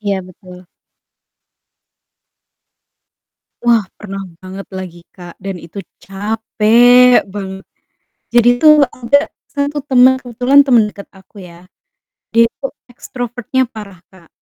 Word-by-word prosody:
Iya 200 -2 -2
betul. 180 0 -15 3.0
Wah 235 -3 +3
pernah 195 -2 -8 0.2
banget 190 +1 -9
lagi, 175 -2 -9 0.2
Kak, 175 -2 -11
dan 195 0 -6
itu 175 +3 -9 0.2
capek 225 +4 +3
banget. 190 -1 -8 0.7
Jadi 240 0 +4
tuh 305 -1 +7
ada 280 +5 0 0.2
1 285 0 -2
teman, 260 -2 +4
kebetulan 255 +3 +2
temen 235 -5 +3
deket 200 -1 -12
aku 190 +2 -21
ya, 175 +1 -16 0.6
dia 230 0 +4
itu 250 - -7 0.3
ekstrovert-nya 245 +2 -4
parah, 205 -4 -10
Kak, 175 -3 -20
215 Hz, 110 wpm, -15 LUFS, 190-245 Hz, 3.0 s, tuh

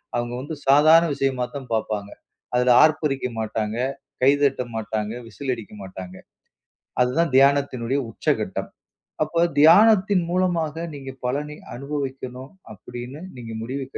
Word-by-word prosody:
அவுங்க 120 0 -2
வந்து 150 +4 -6
சாதாரண 155 +4 +7
விஷயமா 135 -3 0
தான் 135 -3 -6
பாப்பாங்க. 105 -2 -2 0.5
அதுல 125 0 +4
ஆர்ப்பரிக்க 150 -4 +1
மாட்டாங்க, 110 0 -2 0.5
கை 135 - +7
தட்ட 140 -3 +2
மாட்டங்க, 110 -1 -3
விசில் 135 +3 -4
அடிக்க 110 -2 -11
மாட்டாங்க. 95 -1 -9 0.9
அது 125 - +1
தான் 170 -5 +1
தியானத்தினுடைய 135 -2 +3
உச்சக்கட்டம். - - -2 0.5
அப்ப 170 +2 +1 0.2
தியானத்தின் 195 +2 +6
மூலமாக 170 -3 0
நீங்க 135 -1 -7 0.2
பலனை 150 +4 -3 0.2
அனுபவிக்கணும் 135 -1 -5 0.2
அப்டின்னு 125 +7 -9 0.2
நீங்க 115 -2 -8
முடிவு 135 +3 -4
135 Hz, 120 wpm, -23 LUFS, 120-150 Hz, 0.9 s, சாதாரண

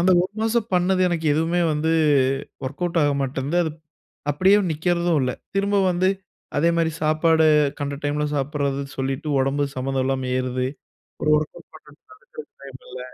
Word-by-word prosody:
அந்த 180 +2 +3
1 185 - -4
மாசம் 225 0 0
பண்ணது 180 +1 +2
எனக்கு 165 -2 -2
எதுவுமே 165 +3 +1
வந்து 155 +2 0 0.7
ஒர்க் 145 +5 -7
அவுட் 170 -1 +1
ஆக 145 - +3
மாட்டன்து. 135 +4 -2
அது 160 - -2 0.6
அப்படியே 190 +7 +4 0.2
நிக்கறதும் 170 +1 +1
இல்லை, 125 -1 -1 0.2
திரும்ப 200 +1 +1
வந்து, 180 +1 +1 0.5
அதே 165 +3 +3
மாரி 165 -1 +2
சாப்பாடு 160 +1 +3 0.3
கண்ட 140 0 -2
டைமில 150 +1 0
சாப்படறது 140 0 -1 0.2
சொல்லிட்டு, 135 +3 -2
உடம்பு 140 +2 0
சம்பந்தம் 130 0 -1
இல்லாம 130 -1 -1
ஏறுது. 130 0 -1 0.6
ஒரு 155 - +2
ஒர்க் 155 0 -4
அவுட் - - -19
பண்லாம்னாலும் 445 +1 -15
டைமில்ல. 130 -1 -10
155 Hz, 150 wpm, -23 LUFS, 135-175 Hz, 0.7 s, அப்படியே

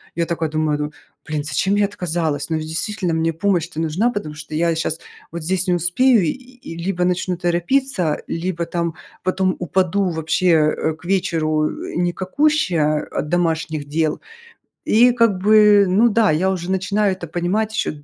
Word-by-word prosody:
я 170 - 0
такая 165 -2 -2
думаю: 155 -1 0
"Ну, 150 0 -3 0.4
блин, 150 -2 -2
зачем 155 +6 0
я 205 - +3
отказалась?" 165 -6 -2
Ну 160 - 0
ведь 155 0 -5
действительно, 180 +2 -2
мне 165 0 0
помощь-то 170 -2 -1
нужна, 165 +9 +1
потому 155 -9 -5
что 155 0 -8
я 170 +1 +1
щас 160 0 -2 0.3
вот 170 -1 -6
здесь 185 +2 -1
не 180 - +3
успею, 200 +7 +3
и 155 - +1 0.3
и 165 - -7
либо 180 -2 0
начну 180 0 -1
торопиться, 175 - 0
либо 170 0 -3
там 170 -1 -2 0.3
потом 185 0 0
упаду 185 +1 0
вообще, 160 +2 -1
э, 155 +1 +1
к 165 +2 -18
вечеру, 160 -5 +1
э, - - -7
никакущая 180 - +1
от 150 - -3
домашних 160 -3 -1
дел. 155 +1 -1 0.7
И 240 +3 +5
как 230 -3 +4
бы, 210 0 +6
ну 210 +6 +4
да, 220 -4 +3
я 180 +5 +1
уже 185 -1 -3
начинаю 200 +1 +1
это 175 -2 -8
понимать 185 +7 -1
еще 150 -8 -3
175 Hz, 170 wpm, -20 LUFS, 160-195 Hz, 0.7 s, бы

